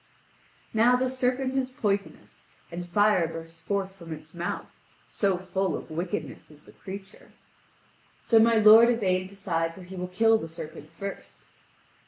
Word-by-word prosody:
Now 230 +3 +5
the 255 +1 +1
serpent 255 +1 0
is 265 -1 0
poisonous, 205 -5 -3 0.3
and 175 +1 -6
fire 205 -2 +3
bursts 165 0 -9
forth 195 +1 -2
from 170 -4 -11
its 155 0 -9
mouth 175 0 -4 0.4
so 195 -3 0
full 190 +1 -2
of - - -11
wickedness 160 -3 -4
is 150 0 -17
the - - -15
creature. 195 +1 -11 0.9
So 225 - +5
my 230 +1 +5
lord 220 +2 +8
Yvain 185 -6 +1
decides 170 -4 -2
that 180 -1 -12
he 190 - -8
will 180 0 -4
kill 225 +4 +3
the 165 - -7
serpent 155 -1 -9
first. 200 0 -7
190 Hz, 155 wpm, -27 LUFS, 170-225 Hz, 0.9 s, lord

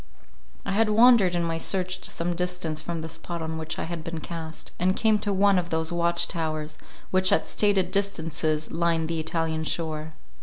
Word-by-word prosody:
I - - -2
had 215 +2 +3
wandered 220 -4 +6
in 170 - +1
my 165 -1 -1
search 185 +1 -1
to - - -4
some 175 +1 -2
distance 180 -3 -2
from 165 0 -4
the 160 - -5
spot 165 +1 -5
on 160 0 -4
which 160 0 -4
I - - -2
had 170 -1 -5
been 165 -1 -4
cast, 160 -1 -7
and 185 +2 +2
came 220 -2 +3
to 205 - -2
one 200 -1 +4
of 175 -1 -4
those 160 0 -1
watch 170 0 +3
towers, 155 -2 -3 0.3
which 185 0 +3
at - - +2
stated 195 -3 +2
distances 160 -6 -1
line 165 -1 +1
the 165 0 -2
Italian 160 0 -1
shore. 155 -1 -2
170 Hz, 195 wpm, -26 LUFS, 160-185 Hz, 0.3 s, wandered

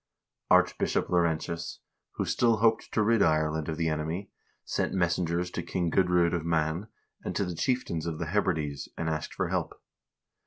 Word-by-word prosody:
Archbishop - - +3
Laurentius, 85 -1 0 0.4
who - - -2
still 115 -2 +3
hoped 115 +1 +2
to 110 - +2
rid 115 0 +3
Ireland 80 -1 +2
of 80 - -3
the 85 -1 0
enemy, 80 +5 -2 0.3
sent - - -1
messengers 90 0 0
to - - -3
King 85 -3 -2
Gudr0d 90 -1 +3
of 85 -2 -1
Man, 80 +3 0 0.4
and - - -4
to 100 - +1
the 90 - -4
chief 125 +8 0
tains 80 -1 -3
of 80 -2 -3
the 85 - -3
Hebrides, 80 -8 -1
and 80 - -2
asked 80 -1 -3
for - - -1
help. - - -2
85 Hz, 170 wpm, -29 LUFS, 80-95 Hz, 0.4 s, Archbishop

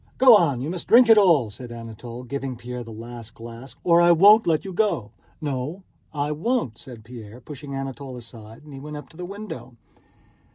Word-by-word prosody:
"Go 255 -3 +8
on, 145 - +2
you 145 +5 -3
must 180 -2 -5
drink 235 0 +7
it 225 - +8
all," 160 - +4
said 120 +3 -10
Anatole, 115 +1 -9
giving 135 0 -4
Pierre 125 +1 -7
the 115 - -11
last 115 0 -10
glass, 115 +3 -10
"or 170 -1 +5
I 175 0 +6
won't 205 +6 +6
let 160 +1 +1
you 190 - -6
go!" 170 - 0 0.3
"No, 145 +5 -4 0.3
I 145 -1 -2
won't," 155 - -1
said 120 -4 -11
Pierre, 115 -1 -11
pushing 140 +2 -9
Anatole 135 -1 -6
aside, 115 0 -12
and 150 -1 -13
he 135 - -8
went 150 +2 -7
up 150 - -10
to 160 - -18
the 180 - -5
window. 190 - -8
135 Hz, 200 wpm, -24 LUFS, 120-170 Hz, 0.3 s, Go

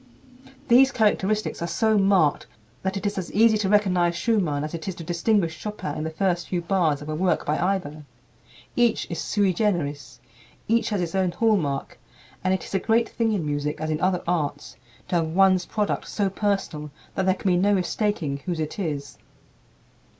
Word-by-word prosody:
These 260 +3 +6
characteristics 215 -4 0
are 170 - -1
so 220 +4 +1
marked 195 -7 +3 0.3
that 190 +1 -2
it 195 - -5
is 200 -1 -1
as 180 - -6
easy 220 +1 +5
to 195 -2 0
recognize 180 -4 +3
Schumann 170 -8 0
as 155 - -5
it 165 +1 -6
is 190 - -3
to 170 - -8
distinguish 170 +1 +1
Chopin 210 -8 -5
in 155 - -3
the 160 - -2
first 175 +1 -1
few 180 - 0
bars 170 -5 +1
of 150 - -8
a - - -2
work 180 +4 0
by 150 +1 0
either. 175 -5 -1 0.7
Each 240 -2 +2
is 170 - -3
sui 200 -3 +1
generis, 165 -8 -2 0.5
each 230 +1 +2
has 205 -4 -1
his 170 -2 -3
own 190 -1 +1
hallmark, 185 -12 0 0.4
and 185 - +1
it 190 - 0
is - - -10
a 195 - +2
great 230 +3 +2
thing 230 -1 0
in 195 -7 -1
music, 150 0 -2
as 155 0 -2
in 155 - -2
other 185 -1 +1
arts, 150 -4 -2 0.3
to 175 - +2
have 165 -1 0
one's 185 +2 +3
product 210 -2 -1
so 200 -2 0
personal 195 -7 -2 0.2
that 190 -1 -1
there 185 - +4
can 190 - 0
be 175 - +3
no 200 +3 +3
mistaking 185 -6 -1
whose 170 +3 -4
it 155 +6 -4
is. 145 -6 -4
185 Hz, 195 wpm, -24 LUFS, 160-205 Hz, 0.7 s, These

